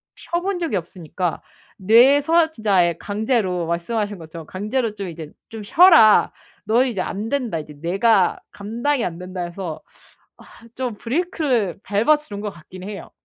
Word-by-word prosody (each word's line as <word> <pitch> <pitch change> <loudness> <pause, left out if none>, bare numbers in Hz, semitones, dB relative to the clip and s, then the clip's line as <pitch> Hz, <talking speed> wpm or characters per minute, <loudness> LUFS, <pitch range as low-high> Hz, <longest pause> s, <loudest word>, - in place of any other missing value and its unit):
쉬어 345 0 -3
본 390 +1 -2
적이 325 - -1
없으니까 175 0 -4 0.4
뇌에서 280 - +4
진짜 205 - +2
예 170 - -2
강제로 205 -5 -1
말씀하신 205 +4 -2
것처럼 160 0 -10
강제로 215 +3 -2
좀 195 -3 -5
이제 160 -2 -9 0.2
'좀 220 -1 -8
쉬어라. 315 - +6 0.3
너 225 +4 +3
이제 230 -8 -2
안된다. 225 - -3
이제 150 -1 -10
내가 195 +2 +2
감당이 235 +6 -2
안 170 -1 -4
된다.' 180 0 -6
해서 175 -2 -6 0.8
아 230 - -15
좀 255 -3 -3
브레이크를 255 - -1
밟아 215 +10 +3
주는 205 -9 -9
것 210 - -3
같긴 180 +1 -13
해요. 205 0 -8
210 Hz, 315 characters per minute, -21 LUFS, 180-250 Hz, 0.8 s, 쉬어라